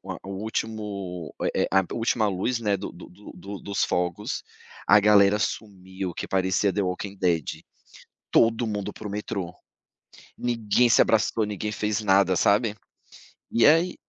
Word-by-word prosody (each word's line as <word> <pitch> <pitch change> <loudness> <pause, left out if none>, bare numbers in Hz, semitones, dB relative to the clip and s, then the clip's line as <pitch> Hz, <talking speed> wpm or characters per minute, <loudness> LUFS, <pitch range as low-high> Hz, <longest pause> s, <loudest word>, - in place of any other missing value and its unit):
oa - - -6
o 95 - -7
último, 100 -7 -4
eh - - 0
eh - - -2
a 95 - +5
do 90 - -7
última 115 -1 +1
luz, 100 +6 -1
né, 105 -3 +1
do 95 - -7
do 85 - -12
do 100 +3 -13
do 100 +2 -8
dos 100 -1 -2
fogos 90 -1 -2 0.4
a 105 +1 +7
galera 105 0 +5
sumiu 95 -4 -4
que - - -5
parecia 95 +1 +1
The 100 - 0
Walking 95 +2 -4
Dead 85 -5 -1 0.7
todo 115 +1 +3
mundo 105 -2 -3
pro 105 - -8
metrô. 100 -3 -4 0.8
Ninguém 120 0 +1
se - - +6
abraçou, 110 0 +2
ninguém 105 0 -4
fez 105 0 -1
nada, 95 -2 +3
sabe? 105 +3 +2 0.8
E 115 - +2
aí, 165 +4 +4
100 Hz, 160 wpm, -25 LUFS, 95-110 Hz, 0.8 s, a